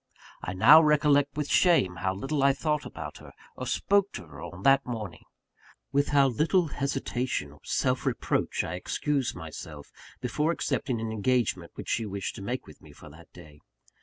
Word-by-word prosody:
I 95 Hz, -, -4 dB
now 145 Hz, +12 st, +8 dB
recollect 145 Hz, -2 st, +3 dB
with 150 Hz, -1 st, -1 dB
shame 120 Hz, -, +3 dB
how 95 Hz, +2 st, -1 dB
little 135 Hz, +8 st, -2 dB
I 140 Hz, 0 st, +5 dB
thought 150 Hz, +1 st, -1 dB
about -, -, -8 dB
her, -, -, -13 dB, 0.2 s
or -, -, -6 dB
spoke 200 Hz, 0 st, +2 dB
to -, -, -7 dB
her 75 Hz, -2 st, -12 dB
on 90 Hz, +3 st, -9 dB
that 135 Hz, 0 st, +5 dB
morning; 110 Hz, -7 st, -6 dB, 0.7 s
with 140 Hz, +1 st, +2 dB
how 140 Hz, -1 st, +4 dB
little 160 Hz, -, +1 dB
hesitation 130 Hz, -, -2 dB
or 75 Hz, -, -17 dB
self -, -, 0 dB
reproach -, -, 0 dB
I 80 Hz, -, -4 dB
excused 135 Hz, +8 st, -1 dB
myself 80 Hz, -3 st, -9 dB, 0.4 s
from 150 Hz, +6 st, 0 dB
accepting 130 Hz, -7 st, -1 dB
an 110 Hz, 0 st, -3 dB
engagement 120 Hz, +2 st, 0 dB
which -, -, -8 dB
she 115 Hz, -2 st, 0 dB
wished 100 Hz, -1 st, -4 dB
to -, -, -8 dB
make 120 Hz, +5 st, -4 dB
with 75 Hz, -, -15 dB
me 75 Hz, -, -15 dB
for 80 Hz, 0 st, -14 dB
that 80 Hz, +2 st, -16 dB
day. 75 Hz, -4 st, -15 dB
125 Hz, 180 wpm, -28 LUFS, 90-145 Hz, 0.7 s, now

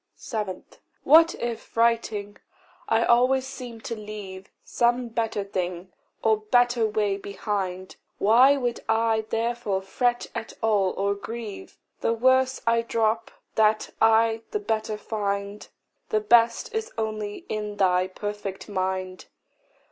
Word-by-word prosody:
7. 210 Hz, -5 st, -4 dB, 0.4 s
What 325 Hz, +2 st, +6 dB
if, 235 Hz, -1 st, -6 dB
writing, 225 Hz, -3 st, +1 dB, 0.5 s
I 225 Hz, +1 st, +3 dB
always 255 Hz, +2 st, +3 dB
seem 250 Hz, -4 st, -8 dB
to 230 Hz, -, -4 dB
leave 205 Hz, -3 st, -8 dB
Some 240 Hz, 0 st, +1 dB
better 225 Hz, -2 st, -1 dB
thing, 185 Hz, -2 st, -4 dB, 0.3 s
or 220 Hz, -1 st, +4 dB
better 240 Hz, +1 st, +2 dB
way, 210 Hz, -2 st, 0 dB
behind, 195 Hz, -2 st, -4 dB, 0.2 s
Why 255 Hz, +7 st, +5 dB
should 245 Hz, -2 st, -2 dB
I 225 Hz, -1 st, +2 dB
therefore 225 Hz, -4 st, -1 dB
fret 240 Hz, +4 st, 0 dB
at 220 Hz, -, -5 dB
all, 205 Hz, -4 st, +2 dB
or 200 Hz, +1 st, +1 dB
grieve! 225 Hz, -, -8 dB, 0.2 s
The 230 Hz, -, +1 dB
worse 260 Hz, +2 st, +3 dB
I 230 Hz, 0 st, +3 dB
drop, 225 Hz, -1 st, 0 dB, 0.2 s
that 215 Hz, 0 st, +2 dB
I 225 Hz, 0 st, +4 dB
the 420 Hz, -, -2 dB
better 220 Hz, -, -2 dB
find; 200 Hz, -1 st, -3 dB, 0.4 s
The 215 Hz, -, +2 dB
best 230 Hz, -, +3 dB
is 445 Hz, 0 st, -3 dB
only 215 Hz, -2 st, -4 dB
in 210 Hz, -1 st, -4 dB
thy 185 Hz, -1 st, +3 dB
perfect 205 Hz, 0 st, -6 dB
mind. 185 Hz, -2 st, -3 dB
220 Hz, 125 wpm, -25 LUFS, 200-235 Hz, 0.5 s, What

